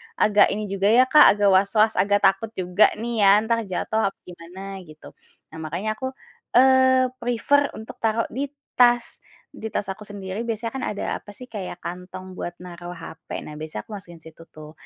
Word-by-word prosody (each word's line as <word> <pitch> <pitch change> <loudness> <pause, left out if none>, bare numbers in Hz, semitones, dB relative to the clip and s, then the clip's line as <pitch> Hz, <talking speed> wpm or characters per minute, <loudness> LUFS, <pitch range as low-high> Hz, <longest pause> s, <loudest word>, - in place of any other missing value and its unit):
agak 210 -1 +4
ini 210 -1 -5
juga 195 0 0
ya, 235 +4 +6
Kak, 295 -2 +7
agak 205 -1 +3
was-was, 210 +3 +3
agak 205 +1 +2
takut 195 +3 +3
juga 180 +2 +3
nih 230 +1 -4
ya 200 -1 +6
entar 230 +1 +1
jatuh 220 +3 -1
apa 195 - -5
gimana 185 +3 -9
gitu. 155 0 -14 0.4
Nah 160 - -10
makanya 185 +8 -4
aku, 260 +2 -4 0.4
eee, 260 0 +5
prefer 245 +4 +2
untuk 220 - -10
taruh 225 0 +1
di 275 +4 -3 0.3
tas. 240 -1 +4 0.3
Di 220 - -6
tas 205 - -2
aku 190 - -10
sendiri 205 +2 -6
biasanya 230 0 -3
kan 265 - -4
ada - - -4 0.2
apa - - -17
sih 250 - -9
kayak 190 -4 -7
kantong 185 +1 -8
buat 175 - -5
naruh 175 0 -9
hape, 165 -1 -9
nah 150 - -9
biasanya 155 0 -6
aku 225 - -16
masukin 175 -3 -13
situ 160 +1 -14
tuh. 155 0 -12
205 Hz, 185 wpm, -23 LUFS, 180-230 Hz, 0.4 s, Kak